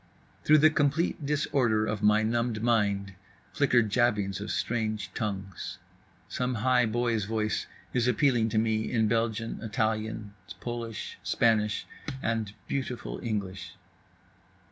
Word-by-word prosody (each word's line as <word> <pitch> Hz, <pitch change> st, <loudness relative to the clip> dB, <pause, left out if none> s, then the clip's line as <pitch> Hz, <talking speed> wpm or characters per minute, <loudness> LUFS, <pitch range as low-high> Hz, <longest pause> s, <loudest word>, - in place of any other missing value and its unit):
Through 155 Hz, -, +6 dB
the 155 Hz, +1 st, +6 dB
complete 150 Hz, +1 st, +1 dB
disorder 130 Hz, -7 st, +2 dB
of 105 Hz, -1 st, -2 dB
my 105 Hz, +1 st, +4 dB
numbed 115 Hz, 0 st, 0 dB
mind 100 Hz, -4 st, +1 dB, 0.4 s
flicker 125 Hz, -5 st, +4 dB
jabbings 105 Hz, -3 st, +1 dB
of 105 Hz, -, -5 dB
strange 110 Hz, -2 st, -2 dB
tongues. 100 Hz, -4 st, -4 dB, 0.5 s
Some 125 Hz, 0 st, -2 dB
high 125 Hz, +1 st, +3 dB
boy's 115 Hz, -2 st, 0 dB
voice 110 Hz, 0 st, -1 dB, 0.3 s
is 125 Hz, -1 st, +2 dB
appealing 125 Hz, -2 st, +3 dB
to 110 Hz, -, -1 dB
me 110 Hz, 0 st, +1 dB
in 110 Hz, -3 st, +2 dB
Belgian, 115 Hz, 0 st, -1 dB
Italian, 110 Hz, -1 st, -2 dB, 0.3 s
Polish, 115 Hz, -2 st, -5 dB
Spanish 105 Hz, -2 st, +2 dB, 0.4 s
and—beautiful 115 Hz, +3 st, -3 dB
English. 100 Hz, -5 st, -4 dB
110 Hz, 115 wpm, -28 LUFS, 105-120 Hz, 0.5 s, Through